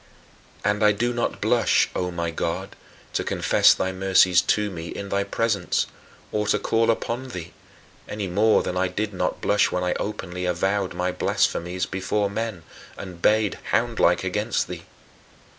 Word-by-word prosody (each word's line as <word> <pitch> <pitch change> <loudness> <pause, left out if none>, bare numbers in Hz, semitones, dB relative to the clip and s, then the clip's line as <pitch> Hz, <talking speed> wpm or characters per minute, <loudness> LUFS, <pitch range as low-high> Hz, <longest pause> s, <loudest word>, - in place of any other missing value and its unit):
And 105 +1 +1
I 105 -1 +6
do 120 +4 -1
not 120 0 -2
blush, - - +3
O 90 - -1
my 85 -1 -3
God, 85 +1 -3 0.4
to - - 0
confess - - +4
thy 95 - -1
mercies 95 -1 +4
to 105 +2 0
me 85 -2 -6
in 100 0 -6
thy 100 0 +1
presence, 100 -2 0 0.5
or 105 -1 -1
to - - +3
call 115 0 +1
upon 120 +3 -1
thee 90 -10 -8 0.6
any 105 -1 -3
more 105 +4 +3
than 90 - -3
I 95 +1 +1
did 105 +2 -3
not 95 - -2
blush 105 - +2
when 90 - -1
I 90 - +1
openly 90 -3 -4
avowed 95 +2 0
my 90 +1 -1
blasphemies 90 0 0
before 100 +2 -1
men, 110 -5 -4 0.3
and 90 -3 -9
bayed, 105 -1 +2
houndlike, - - +2
against - - -1
thee. - - -8
100 Hz, 160 wpm, -24 LUFS, 90-105 Hz, 0.6 s, I